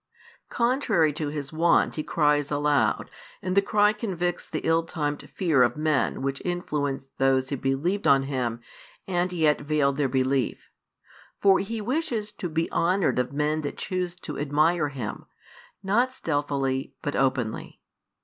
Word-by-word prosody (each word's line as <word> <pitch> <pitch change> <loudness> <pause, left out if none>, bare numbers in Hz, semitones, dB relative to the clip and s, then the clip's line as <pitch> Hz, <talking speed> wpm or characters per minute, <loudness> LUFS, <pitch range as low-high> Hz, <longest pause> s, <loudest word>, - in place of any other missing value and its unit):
Contrary 235 - +2
to 150 0 -3
His 145 -1 -5
wont 170 +2 +3
He 155 - -3
cries 150 -2 +1
aloud, 145 0 +1 0.3
and 185 +1 -3
the 200 - +6
cry 210 +1 +3
convicts 180 -5 -3
the - - -3
ill 165 0 +3
timed 150 -3 -4
fear 160 -8 +2
of 120 +1 +3
men 150 -4 0
which 135 0 -2
influenced 145 -6 -3
those 135 0 +2
who 140 - -2
believed 145 +11 0
on 135 -1 +5
Him 125 -4 -2 0.5
and 180 -1 0
yet 155 -5 +2
veiled 145 -2 +1
their 145 -3 +1
belief. 130 0 -1 0.7
For 195 -1 +5
He 225 +3 -3
|162 - - -7
wishes 240 -6 -1
to 195 -4 -5
be 165 +1 -1
honoured 180 -4 +2
of 125 +1 -1
men 150 +2 0
that 145 - -5
choose 180 -1 -3
to - - -6
admire 150 +2 +2
Him, 130 -6 -6 0.6
not 240 +7 +1
stealthily, 140 - -1
but 145 - -2
openly. 130 -4 -1
150 Hz, 155 wpm, -26 LUFS, 140-180 Hz, 0.7 s, the